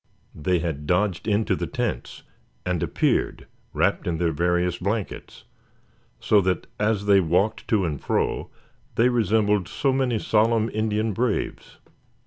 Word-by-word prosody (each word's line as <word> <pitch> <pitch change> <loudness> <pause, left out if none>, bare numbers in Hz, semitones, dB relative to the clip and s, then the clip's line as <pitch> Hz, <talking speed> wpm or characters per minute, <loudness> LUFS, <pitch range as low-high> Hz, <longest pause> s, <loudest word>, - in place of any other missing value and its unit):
They 90 +4 0
had 80 -3 -3
dodged 90 +2 0
into 105 +1 +1
the - - -3
tents, - - -4 0.4
and 90 -3 -1
appeared - - 0 0.3
wrapped - - 0
in 85 -2 0
their 85 0 +1
various 90 +2 0
blankets; 100 +2 -4 0.8
so 105 -2 +4
that 95 -1 -1
as 105 -1 +1
they 100 -1 +6
walked 90 +5 0
to 105 -4 +2
and 75 -5 -3
fro - - -1 0.5
they 120 +2 +4
resembled 105 -4 +2
so 135 +6 0
many 130 -3 +1
solemn 110 +1 +2
Indian 110 0 0
braves. 120 +4 -2
100 Hz, 135 wpm, -24 LUFS, 90-110 Hz, 0.8 s, they